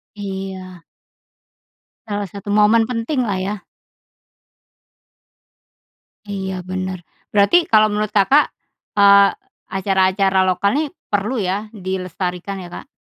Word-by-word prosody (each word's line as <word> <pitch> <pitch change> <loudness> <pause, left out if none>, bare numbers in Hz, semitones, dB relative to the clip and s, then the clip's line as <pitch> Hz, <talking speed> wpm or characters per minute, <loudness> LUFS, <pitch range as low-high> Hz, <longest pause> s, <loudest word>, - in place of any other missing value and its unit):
Iya. 190 -3 -7 1.2
Salah 205 -2 -3
satu 200 +2 -7
momen 215 +2 +4
penting 250 +3 -1
lah 195 -2 -1
ya? 205 +2 -3 2.7
Iya, 190 -2 -4
benar. 185 0 -4 0.3
Berarti, 210 +13 +4
kalau 215 -1 +6
menurut 210 0 -1
Kakak, 210 +9 +4 0.5
eee, 200 0 +7 0.4
acara-acara 190 0 +1
lokal 185 +2 +1
nih, 300 +1 0 0.2
perlu 205 +6 0
ya 200 +2 -2
dilestarikan 185 -1 -4
ya 175 - -9
Kak? - - -25
200 Hz, 100 wpm, -19 LUFS, 190-210 Hz, 2.7 s, eee